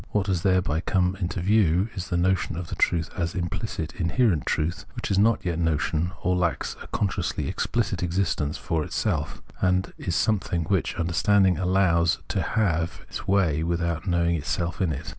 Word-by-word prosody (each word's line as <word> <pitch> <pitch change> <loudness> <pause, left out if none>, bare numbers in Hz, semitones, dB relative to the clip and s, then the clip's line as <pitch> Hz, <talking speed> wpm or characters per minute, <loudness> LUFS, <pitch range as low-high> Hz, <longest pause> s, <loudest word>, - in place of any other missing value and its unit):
What 105 -2 0
has 95 -4 0
thereby 90 -5 +2
come 90 0 +1 0.2
to 90 - -4
view 95 0 +3
is 95 -2 -5
the 90 - 0
notion 90 -2 +1
of 85 -1 -5
the - - -4
truth 80 -2 +1
as 85 -2 -2
imphcit 85 -2 -3
inherent 85 - +1
truth, 80 +3 -1
which - - -4
is 95 - +3
not 110 0 +3
yet 85 -2 -1
notion, 80 +1 0
or 90 0 +2
lacks 90 -2 -1
a - - -9
consciously 100 -3 -1
explicit - - -1
existence 90 -4 0
for 80 -4 -1
itself - - -2 0.2
(Fiirsichseyn), - - +3
and 90 +1 0
is 85 - -2
something 95 -5 +1
which 95 +2 0
under 85 0 -1
standing 95 0 +3
allows 90 -3 +3
to - - 0
have 85 -7 0
its - - -7
way 95 -6 +2
without 85 +1 -1
knowing 85 -1 +2
itself 85 +3 -2
in 90 -4 +2
it. 70 - -5
90 Hz, 180 wpm, -25 LUFS, 85-95 Hz, 0.2 s, view